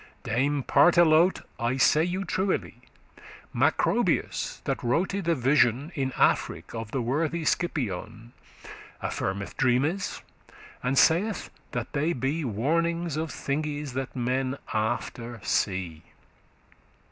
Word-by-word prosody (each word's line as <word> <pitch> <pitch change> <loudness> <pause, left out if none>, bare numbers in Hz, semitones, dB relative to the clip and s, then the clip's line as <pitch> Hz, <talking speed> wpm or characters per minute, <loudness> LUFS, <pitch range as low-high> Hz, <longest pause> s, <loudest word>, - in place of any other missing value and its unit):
Dame 135 +4 0
Partelote, 170 +4 +5 0.2
I 120 +3 0
say 150 +4 +4
you 185 +3 -2
truely, 190 +2 -1 0.8
Macrobius, - - +1
that - - -2
wrote 125 +10 +1
the 180 -4 0
vision 135 +2 +2
In 135 -3 -1
Afric' - - +1
of 115 -1 -5
the 130 +1 -2
worthy 155 +6 -1
Scipion, 115 - -2 0.3
<17> - - -11 0.3
Affirmeth 100 +1 -3
dreames, 140 +9 0 0.6
and 130 +2 0
saith 190 +9 +3 0.2
that 120 -1 -4
they 155 +4 +1
be 140 +5 -1
'Warnings 165 +8 0
of 160 +1 -2
thinges 150 -1 -3
that 135 0 -4
men 130 +2 -1 0.2
after 115 +1 -2
see. 90 -5 -1
140 Hz, 110 wpm, -27 LUFS, 120-165 Hz, 0.8 s, Partelote